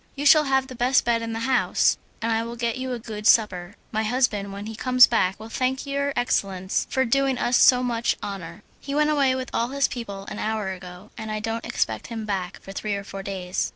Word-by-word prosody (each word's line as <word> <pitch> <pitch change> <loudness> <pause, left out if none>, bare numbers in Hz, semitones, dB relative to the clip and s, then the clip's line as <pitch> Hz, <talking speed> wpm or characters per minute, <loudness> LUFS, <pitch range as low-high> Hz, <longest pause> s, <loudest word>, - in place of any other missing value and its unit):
"You 285 +1 -4
shall 300 +1 +7
have 265 -1 +2
the 260 - -10
best 250 +1 +2
bed 235 -1 +2
in 230 0 -4
the 225 - -3
house, 260 +1 +2 0.3
and 230 - 0
I 225 0 +1
will 230 +1 -5
get 235 +1 -2
you 260 0 -3
a 245 - -2
good 215 -2 -4
supper. 195 -3 +3 0.2
My 220 - 0
husband 215 -3 0
when 200 +1 -7
he 220 0 -6
comes 255 +2 +6
back 190 -5 0
will 220 - -8
thank 260 +4 -1
your 280 0 -1
excellence 195 -6 0
for 265 -1 +1
doing 270 +2 +1
us 240 +1 +2
so 250 -1 +6
much 235 -1 0
honour. 195 0 -7 0.2
He 280 0 -5
went 300 0 +3
away 275 -3 +3
with 260 -1 -5
all 235 - +1
his 275 +2 +1
people 200 -5 -6
an 210 - -6
hour 215 -2 -2
ago, 180 +1 -9
and 220 0 -6
I 215 - -2
don't 225 +2 -4
expect - - -2
him 225 -2 -5
back 195 -3 -3
for 195 - -9
three 205 +1 -3
or 200 - -5
four 195 0 -7
days." 190 -2 -3
230 Hz, 235 wpm, -24 LUFS, 200-255 Hz, 0.3 s, shall